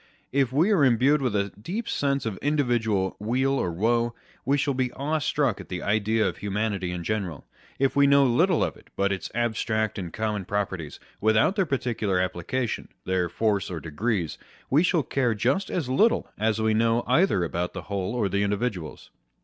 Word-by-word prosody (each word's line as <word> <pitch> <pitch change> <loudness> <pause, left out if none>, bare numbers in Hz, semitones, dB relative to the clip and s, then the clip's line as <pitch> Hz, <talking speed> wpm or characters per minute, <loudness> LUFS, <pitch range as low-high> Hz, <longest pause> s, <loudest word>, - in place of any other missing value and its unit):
If 135 -2 +2
we 160 +10 +3
are 185 -8 +4
imbued 135 +4 +4
with 125 -5 0
a 100 -1 0
deep 215 - -4
sense 140 -2 0
of 110 -4 -3
individual 120 -9 +1
weal 125 +6 +1
or 130 -10 0
woe, 115 +6 +1 0.3
we 140 +3 +2
shall 140 0 0
be 130 -1 -1
awestruck 145 -4 0
at - - -13
the 90 -1 -4
idea 110 +1 +1
of - - -4
humanity 100 -2 -2
in 90 -1 -4
general. 95 -7 -3 0.3
If 135 0 +1
we 140 0 +5
know 140 0 +6
little 165 +8 +3
of - - -2
it - - -19
but 100 0 +1
its 95 - -3
abstract 110 -2 0
and 90 -3 -5
common 105 -2 -2
properties, 95 -6 -3 0.2
without 110 - +3
their 195 -4 +1
parti 130 -3 -1
cular 100 -4 0
application, 95 +6 -2 0.2
their 90 -2 0
force 105 +1 0
or 85 -3 -4
degrees, 85 +2 -2 0.3
we 145 +4 +5
shall 175 -3 +2
care 125 -5 0
just 130 - 0
as 165 -8 -2
little 210 - +2
as 110 +1 0
we 110 0 +2
know 115 +2 +2
either 130 - +3
about 85 +1 -2
the 90 - -6
whole 100 +3 -3
or 110 -5 +1
the 100 +1 0
individuals. 100 -5 -3
110 Hz, 190 wpm, -26 LUFS, 100-135 Hz, 0.3 s, know